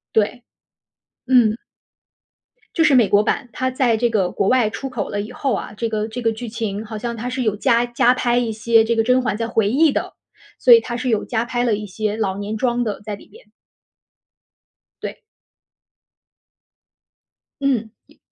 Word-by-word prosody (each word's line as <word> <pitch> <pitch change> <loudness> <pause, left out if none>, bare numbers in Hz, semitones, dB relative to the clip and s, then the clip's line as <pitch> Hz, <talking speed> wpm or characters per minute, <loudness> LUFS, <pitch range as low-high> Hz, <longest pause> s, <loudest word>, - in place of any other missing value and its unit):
对， 220 +3 +1 0.9
嗯。 235 -4 +4 1.2
就 330 - +3
是 300 -3 +4
美 240 -5 +5
国 205 +1 +4
版， 245 - -1
它 260 0 -1
在 250 -3 +2
这 240 +2 +1
个 200 -5 +1
国 195 - 0
外 250 -4 +3
出 270 +5 -6
口 240 -6 -4
了 205 - -2
以 210 +4 -8
后 270 -3 -1
啊， - - -5
这 230 - -1
个 215 0 -2
这 240 +3 -5
个 225 -1 +1
剧 230 +1 -7
情 215 -2 -4
好 220 0 -6
像 235 +2 -4
它 235 +2 -4
是 255 +1 -3
有 215 -4 0
加 235 +1 +2
加 240 0 +3
拍 245 -1 0
一 235 -2 0
些 225 +1 +3
这 230 +1 0
个 - - +4
甄 250 +2 +3
嬛 220 -4 -2
在 230 - -2
回 225 -3 +1
忆 295 +3 +4
的， - - -3 0.5
所 - - +7
以 460 - +7
它 240 - -5
是 255 +1 -4
有 220 -4 +1
加 230 -1 -2
拍 240 0 -1
了 235 -3 +2
一 210 +1 -6
些 210 +2 -3
老 195 -3 -1
年 205 +2 -4
妆 245 +1 0
的 210 -3 -3
在 210 0 -5
里 - - -17
边。 465 +3 -17 1.6
对。 - - -6 2.4
嗯， 240 -6 0 0.2
一 - - -24
230 Hz, 205 characters per minute, -20 LUFS, 215-250 Hz, 2.4 s, 所